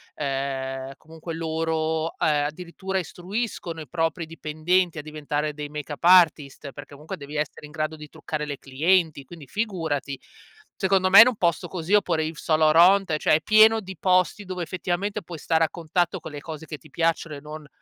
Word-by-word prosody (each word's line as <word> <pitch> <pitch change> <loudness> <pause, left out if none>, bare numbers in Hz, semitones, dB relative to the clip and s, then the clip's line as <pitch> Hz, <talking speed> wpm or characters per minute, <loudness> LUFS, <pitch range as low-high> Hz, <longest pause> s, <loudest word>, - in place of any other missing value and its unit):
ehm, 135 -1 -3
comunque 160 +2 -9
loro, 160 0 -1
ehm, 145 -2 +2
addirittura 180 +4 -4
istruiscono 180 -1 -5
i 155 - -8
propri 165 0 -1
dipendenti 165 +2 0
a 150 - -3
diventare 150 0 -3
dei 145 0 -6
makeup 150 +1 -7
artist 155 -6 +4
perché 145 0 -11
comunque 150 +2 -7
devi 145 +1 -8
essere 150 0 -4
in - - -16
grado 155 0 -3
di 150 -1 -11
truccare 155 -1 -5
le 145 -2 -5
clienti, 155 +2 +1
quindi 155 +1 -12
figurati. 160 - -3 0.6
Secondo 190 -1 +2
me 200 - +11
in 240 - +8
un 250 - +1
posto 170 -5 0
così 180 +2 -4
oppure 170 -6 +3
Yves 155 0 -5
Saint 155 -1 +1
Laurent, 170 +3 +5
cioè, - - +2
è 160 - +1
pieno 220 +1 +6
di 190 -1 -9
posti 185 +2 +2
dove 180 -1 -4
effettivamente 185 +3 -3
puoi 170 -1 -9
stare 160 +1 +1
a 160 - +1
contatto 175 +2 -1
con 160 - -9
le 145 - -7
cose 160 0 -8
che 150 -1 -7
ti 145 +3 -18
piacciono 165 0 -1
e 140 - -8
non 150 0 -9
160 Hz, 185 wpm, -24 LUFS, 150-180 Hz, 0.6 s, me